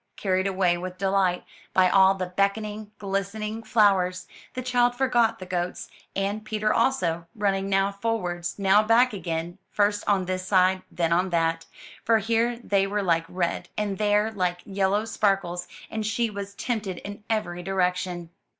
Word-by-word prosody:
Carried 190 -1 0
away 185 -2 +1
with 180 0 -6
delight 190 -2 +1 0.3
by 185 -1 +6
all 190 +1 +5
the 185 -1 -2
beckoning, 210 +1 -1
glistening 205 +3 -3
flowers, 195 -5 +2 0.3
the 255 - -3
child 245 -1 +2
forgot 240 -3 +2
the 185 - -8
goats, 180 -1 -3 0.2
and 200 +2 -1
Peter 215 0 0
also, 170 -11 +1
running 195 -2 0
now 195 0 +2
forwards, 200 -5 -3
now 200 +1 +5
back 230 +3 +4
again; 175 -1 -4
first 205 0 +1
on 195 -3 +2
this 185 0 -2
side, 185 0 +3
then 170 -1 0
on 180 +2 +2
that; 165 -1 0 0.4
for 225 0 +4
here 230 +3 +1
they 195 -2 +2
were 205 +1 -1
like 165 -3 +2
red, 180 -2 -2
and 205 -2 -2
there 210 +1 +2
like 180 -4 -1
yellow 200 +2 0
sparkles, 195 -5 0 0.2
and 220 0 -2
she 225 +1 0
was 200 0 -6
tempted 210 -7 -3
in 205 +3 -8
every 195 -6 -1
direction. 180 -2 -1
195 Hz, 160 wpm, -25 LUFS, 180-215 Hz, 0.4 s, by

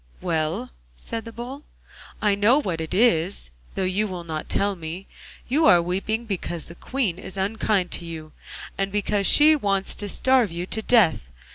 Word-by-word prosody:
'Well,' 155 - -2 0.3
said 225 - -5
the 230 - -7
Bull, 250 +5 -7 0.6
'I 210 -1 +4
know 210 +6 +4
what 175 - -3
it 160 - -5
is, 185 - +2 0.2
though - - -1
you 190 +3 0
will 180 -3 -6
not 155 -2 -5
tell 200 0 +1
me; 170 +2 -7 0.4
you 300 +6 +3
are 175 - +7
weeping 195 +7 -2
because 175 -6 -4
the - - -9
Queen 205 -2 -2
is 190 - -8
unkind 195 -2 0
to 170 - -3
you, 160 -2 -8 0.5
and 195 0 0
because 205 0 +1
she 310 +1 +7
wants 195 -7 0
to 205 -1 -4
starve 260 0 +3
you 170 +1 -4
to 220 +4 -3
death. 160 - +3
195 Hz, 175 wpm, -24 LUFS, 170-220 Hz, 0.6 s, are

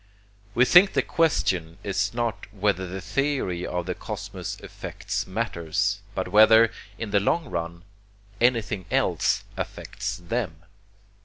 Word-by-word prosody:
We 120 - +6
think 180 +7 +7
the - - +2
question 90 - +1
is 100 0 0
not 115 -3 -3
whether 100 -2 0
the 95 +2 -6
theory 105 -4 -1
of 90 -1 -2
the - - -2
cosmos - - -6
affects - - -5
matters, 100 -1 -1 0.2
but - - -2
whether, 110 +1 +7 0.3
in 115 -3 -5
the 100 - +4
long 145 +8 0
run, 85 0 -4 0.6
anything 115 -5 +1
else - - +1
affects 100 0 -4
them." 90 -3 -4
100 Hz, 130 wpm, -25 LUFS, 90-115 Hz, 0.6 s, think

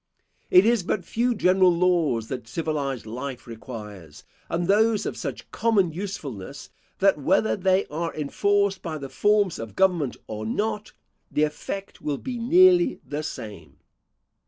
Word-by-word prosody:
It 180 +2 +7
is 235 -2 +3
but 180 +1 -2
few 240 +5 0
general 185 -2 +4
laws 170 -10 +1
that 125 -3 -5
civilised 140 -2 -3
life 125 +3 -6
requires, 105 -8 -10 0.3
and 170 +1 -1
those 215 +2 +3
of - - -3
such - - -6
common 205 -7 +2
usefulness, 150 - -7 0.3
that 195 -5 +3
whether 180 +9 +2
they 190 0 +2
are 165 +3 -3
enforced 200 +6 +1
by 160 -3 -4
the 135 -2 -7
forms 205 -1 +2
of 115 -1 -7
government 175 -9 +2
or 110 0 -6
not, 210 - -2 0.4
the 150 - +1
effect 195 +6 -4
will 145 -2 -2
be 250 - -5
nearly 350 +5 +5
the 150 +1 -4
same. 100 - -8
170 Hz, 145 wpm, -25 LUFS, 135-205 Hz, 0.4 s, It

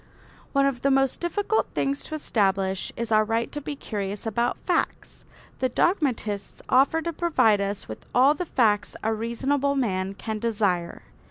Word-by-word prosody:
One 275 -1 +3
of 275 -3 -1
the 275 - +2
most 270 -1 +2
difficult 410 +5 0
things 275 +1 0
to 310 - -5
establish 195 -8 0
is 235 0 -3
our 215 0 +5
right 225 +2 -1
to 295 - -5
be 290 +1 -5
curious 205 -5 -5
about 235 +2 0
facts. 350 -3 -2 0.4
The 255 - +1
dogmatists 240 - 0
offer 280 +5 +4
to 335 - -2
provide 260 -12 +3
us 200 0 -3
with 110 - -9
all 265 +4 +6
the 355 +4 -4
facts 215 -7 +2
a 220 +1 +1
reasonable 270 +6 0
man 195 -7 -1
can 220 +1 -4
desire. 200 -7 -1
235 Hz, 165 wpm, -25 LUFS, 205-280 Hz, 0.4 s, all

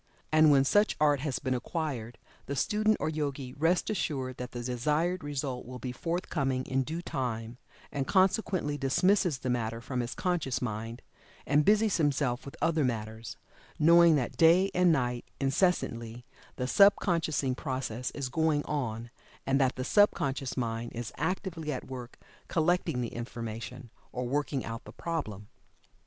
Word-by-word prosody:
And 155 0 +6
when 135 -2 +5
such 205 +8 +3
art 145 -2 +4
has 140 -1 -2
been 130 -2 -1
acquired, 125 -4 -3 0.3
the 140 - -3
student 215 +8 +2
or - - -1
Yogi 140 -4 -3
rests 165 +5 +1
assured 135 -10 -2
that 125 -1 -6
the 120 -1 -5
desired 150 +9 0
result 140 -3 -3
will 125 +1 -8
be 125 0 -5
forthcoming 140 -4 -2
in 135 0 0
due 160 +6 -4
time, 120 -4 -4 0.3
and 135 -1 -2
consequently 185 -6 +2
dismisses 175 +3 +2
the 130 - -4
matter 115 -2 -2
from 125 +2 -4
his 120 0 -3
conscious 175 -9 -1
mind, 115 0 -4 0.4
and 145 +1 +3
busies 215 0 +4
himself 140 -5 0
with 140 - -9
other 165 -2 +2
matters, 110 -2 -3 0.4
knowing 170 +1 +6
that 130 -5 -2
day 175 +4 +5
and 180 -1 +4
night, 125 -5 0 0.2
incessantly, 125 -6 0 0.3
the 125 - -2
sub 200 +9 +6
consciousing 155 -7 0
process 130 -3 -3
is 140 -3 -2
going 155 0 +1
on, 120 -5 -3 0.3
and 135 +1 +2
that 130 -1 +2
the 130 - -3
sub 205 +9 +5
conscious 135 -1 -2
mind 115 -1 -2
is 120 -1 -5
actively 165 0 -2
at 130 - -4
work 125 -2 -8 0.3
collecting 165 -6 +1
the 120 - -4
information, 120 +1 -6 0.2
or 125 0 -3
working 145 0 -1
out 115 0 -6
the - - -10
problem. 110 - -4
135 Hz, 160 wpm, -30 LUFS, 125-160 Hz, 0.4 s, And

